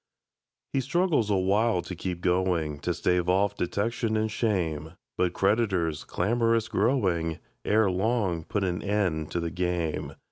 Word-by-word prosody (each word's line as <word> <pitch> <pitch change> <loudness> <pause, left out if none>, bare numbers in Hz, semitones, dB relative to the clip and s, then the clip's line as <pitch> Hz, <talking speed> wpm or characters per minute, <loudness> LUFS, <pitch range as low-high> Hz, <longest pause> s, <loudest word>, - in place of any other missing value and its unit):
He 135 - +2
struggles 150 - +1
awhile 100 0 +2
to 95 - -6
keep 90 0 -4
going, 90 -5 +1
To - - -1
stave 90 0 +1
off 95 +2 +3
detection 110 +4 -1
and 110 0 0
shame; 85 -8 -1 0.2
But 90 -1 +1
creditors, 95 -6 +1
clamorous 115 +3 +1
growing, 95 - +1 0.3
Ere 105 -2 +3
long 95 -3 0
put 100 +5 -2
an 90 -2 -1
end 95 -7 0
to 85 - -2
the 85 -1 -3
game. 90 -2 -2
95 Hz, 140 wpm, -27 LUFS, 85-110 Hz, 0.3 s, off